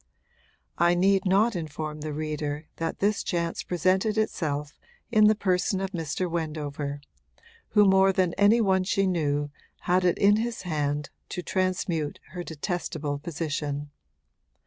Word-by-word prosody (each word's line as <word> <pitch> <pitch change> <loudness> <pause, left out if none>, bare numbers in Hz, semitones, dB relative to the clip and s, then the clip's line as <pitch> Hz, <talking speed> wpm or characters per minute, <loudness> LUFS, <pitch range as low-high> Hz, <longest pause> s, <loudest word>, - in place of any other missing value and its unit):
I 175 +1 +4
need 195 +2 +3
not 205 +4 +3
inform 155 -2 -5
the 155 0 -4
reader 150 0 -3
that 165 0 -2
this 205 +1 +1
chance 170 -2 -2
presented 185 +5 +1
itself 150 -8 -2 0.3
in 215 -2 +6
the 215 - +5
person 190 -1 +1
of 195 0 -3
Mr. 170 0 -2
Wendover, 150 -3 -3 0.8
who 210 - +8
more 190 0 +5
than 185 -2 +1
any 205 +4 +4
one 190 -3 +3
she 195 +1 +1
knew 145 -5 0 0.3
had 180 +1 +2
it 180 -1 +2
in 205 +1 +5
his 230 0 -3
hand 150 -4 -2 0.2
to 180 - -4
transmute 175 -4 -1
her 175 +1 -5
detestable 160 -3 -3
position. 145 -2 -3
175 Hz, 140 wpm, -27 LUFS, 150-190 Hz, 0.8 s, who